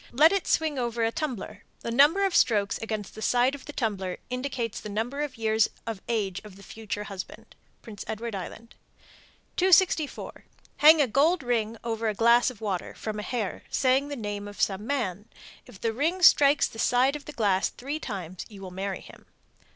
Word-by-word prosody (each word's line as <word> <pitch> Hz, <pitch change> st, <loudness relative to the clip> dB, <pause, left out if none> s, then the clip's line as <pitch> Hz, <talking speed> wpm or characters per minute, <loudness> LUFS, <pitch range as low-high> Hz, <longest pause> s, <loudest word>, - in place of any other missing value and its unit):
Let 300 Hz, +6 st, +6 dB
it 395 Hz, -2 st, -1 dB
swing 310 Hz, -4 st, +1 dB
over 235 Hz, -1 st, -1 dB
a 225 Hz, -, +2 dB
tumbler. 235 Hz, -8 st, -4 dB, 0.2 s
The 230 Hz, -, -4 dB
number 295 Hz, +11 st, +5 dB
of 385 Hz, -, 0 dB
strokes 205 Hz, -3 st, +3 dB
against 215 Hz, -3 st, -4 dB
the 220 Hz, -, -9 dB
side 245 Hz, +3 st, +2 dB
of 285 Hz, -, -8 dB
the 295 Hz, -, -7 dB
tumbler 200 Hz, -9 st, -2 dB
indicates 250 Hz, -3 st, -3 dB
the 210 Hz, -, -7 dB
number 230 Hz, +7 st, -2 dB
of 285 Hz, -4 st, -4 dB
years 220 Hz, -1 st, +2 dB, 0.2 s
of 225 Hz, -4 st, -5 dB
age 200 Hz, -5 st, -1 dB
of 210 Hz, -3 st, -12 dB
the 200 Hz, -, -14 dB
future 215 Hz, -1 st, -6 dB
husband. 195 Hz, -3 st, -9 dB, 0.3 s
Prince 210 Hz, -3 st, -8 dB
Edward 225 Hz, +1 st, -4 dB
Island. 215 Hz, +4 st, -7 dB, 0.8 s
264. 360 Hz, -4 st, +2 dB, 0.3 s
Hang 305 Hz, 0 st, +7 dB
a -, -, 0 dB
gold 295 Hz, +7 st, +2 dB
ring 230 Hz, -2 st, -1 dB
over 225 Hz, -1 st, -2 dB
a 210 Hz, -, -3 dB
glass 235 Hz, +3 st, +5 dB
of 245 Hz, -5 st, -12 dB
water, 195 Hz, -5 st, -3 dB
from 215 Hz, -1 st, -5 dB
a -, -, -2 dB
hair, 215 Hz, -2 st, -3 dB
saying 265 Hz, +2 st, +2 dB
the 290 Hz, -, -5 dB
name 205 Hz, -4 st, -5 dB
of 205 Hz, -, -11 dB
some 205 Hz, +2 st, 0 dB
man. 215 Hz, -7 st, -2 dB, 0.4 s
If 190 Hz, -, -14 dB
the 225 Hz, -1 st, -1 dB
ring 330 Hz, +9 st, -1 dB
strikes 285 Hz, -3 st, +6 dB
the 225 Hz, -, -11 dB
side 255 Hz, +5 st, +3 dB
of 295 Hz, -, -8 dB
the -, -, -7 dB
glass 200 Hz, -7 st, +1 dB
three 285 Hz, +5 st, -5 dB
times 185 Hz, -, -6 dB
you 205 Hz, -3 st, -12 dB
will 185 Hz, -, -7 dB
marry 190 Hz, +1 st, -4 dB
him. -, -, -15 dB
230 Hz, 195 wpm, -27 LUFS, 205-280 Hz, 0.8 s, Hang